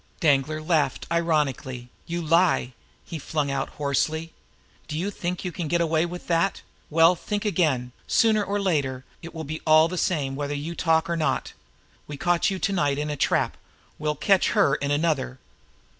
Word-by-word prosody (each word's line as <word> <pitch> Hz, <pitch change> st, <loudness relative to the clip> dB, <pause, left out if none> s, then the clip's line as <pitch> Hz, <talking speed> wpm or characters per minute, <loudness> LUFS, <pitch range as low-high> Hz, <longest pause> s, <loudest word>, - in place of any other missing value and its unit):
Danglar 155 Hz, 0 st, +2 dB
laughed 155 Hz, -5 st, +1 dB
ironically. 145 Hz, -7 st, 0 dB, 0.2 s
"You 170 Hz, 0 st, -3 dB
lie!" 165 Hz, -5 st, +2 dB, 0.3 s
he 165 Hz, -, -6 dB
flung 145 Hz, -1 st, -2 dB
out 135 Hz, 0 st, -2 dB
hoarsely. 155 Hz, +3 st, -1 dB, 0.5 s
"Do 155 Hz, -, -4 dB
you 190 Hz, +5 st, -2 dB
think 180 Hz, -1 st, -4 dB
you 180 Hz, -, -2 dB
can 170 Hz, -2 st, -4 dB
get 170 Hz, +2 st, +1 dB
away 165 Hz, 0 st, +1 dB
with 175 Hz, +1 st, -8 dB
that? 170 Hz, +3 st, 0 dB, 0.3 s
Well, 165 Hz, +3 st, +5 dB
think 205 Hz, +4 st, -4 dB
again! 155 Hz, -11 st, +1 dB, 0.2 s
Sooner 220 Hz, -2 st, +3 dB
or 205 Hz, 0 st, -1 dB
later, 140 Hz, -9 st, -1 dB, 0.2 s
it 170 Hz, 0 st, -10 dB
will 160 Hz, -, -4 dB
be 155 Hz, +2 st, -5 dB
all 155 Hz, +1 st, +6 dB
the 180 Hz, +1 st, -3 dB
same 140 Hz, -7 st, 0 dB
whether 145 Hz, +1 st, -3 dB
you 150 Hz, +4 st, -4 dB
talk 160 Hz, -1 st, +2 dB
or 170 Hz, -, -1 dB
not. 160 Hz, -2 st, -1 dB, 0.5 s
We 145 Hz, -, -7 dB
caught 175 Hz, +3 st, +2 dB
you 190 Hz, -, -2 dB
to 195 Hz, +1 st, -1 dB
night 145 Hz, -6 st, +1 dB
in 150 Hz, +1 st, -2 dB
a -, -, -2 dB
trap; 135 Hz, -, +1 dB, 0.4 s
we'll 150 Hz, 0 st, -1 dB
catch 195 Hz, +5 st, +2 dB
her 140 Hz, -, +4 dB
in 140 Hz, -1 st, -1 dB
another. 145 Hz, -4 st, 0 dB
160 Hz, 180 wpm, -25 LUFS, 145-170 Hz, 0.5 s, all